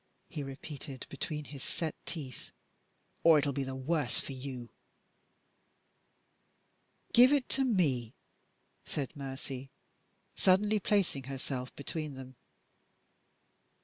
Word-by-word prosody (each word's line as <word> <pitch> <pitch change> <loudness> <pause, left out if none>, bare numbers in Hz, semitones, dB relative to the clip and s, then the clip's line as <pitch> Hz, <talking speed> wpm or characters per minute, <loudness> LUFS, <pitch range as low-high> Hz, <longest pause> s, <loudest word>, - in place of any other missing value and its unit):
he 155 - -4
repeated 135 0 -6
between 150 +1 -3
his 140 -2 -8
set 160 -3 -2
teeth, 140 -8 -5 0.7
"or 165 -2 +9
it 145 - +3
will 140 - +1
be 140 +1 0
the 135 0 -4
worse 135 -1 +1
for - - -4
you!" 130 -3 -6 2.4
"Give 250 +3 +9
it 285 -3 +3
to 270 - +3
me!" 140 - +2 0.7
said 145 0 -3
Mercy, 135 -1 -5 0.7
suddenly 205 +3 +4
placing 190 -10 +2
herself 130 -1 -4
between 150 0 -4
them. 130 0 -9
140 Hz, 110 wpm, -33 LUFS, 130-165 Hz, 2.4 s, or